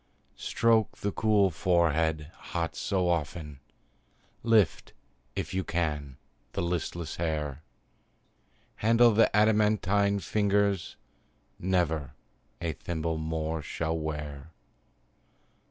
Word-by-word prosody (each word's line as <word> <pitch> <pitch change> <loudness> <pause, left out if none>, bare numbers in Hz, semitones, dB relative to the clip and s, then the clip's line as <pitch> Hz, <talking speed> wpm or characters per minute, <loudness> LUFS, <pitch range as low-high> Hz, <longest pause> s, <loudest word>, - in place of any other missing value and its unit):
Stroke 115 -2 +2
the 100 - -2
cool 105 -2 +3
forehead, 80 -2 +1
hot 85 -2 -4
so 95 -3 0
often, 75 -3 -2 0.8
Lift, 110 -5 +2 0.4
if - - -3
you 95 0 0
can, 75 -6 -2 0.4
the - - -1
listless 85 -1 -3
hair; 75 -4 -2 1.2
Handle 115 +2 +5
the 110 +1 +4
adamantine 105 -1 +3
fingers 100 -2 +1 0.6
Never 85 -6 0 0.4
a 85 -2 -2
thimble 80 +1 -3
more 80 0 -2
shall 80 +2 -2
wear. 75 -2 -5
85 Hz, 90 wpm, -29 LUFS, 80-100 Hz, 1.2 s, Handle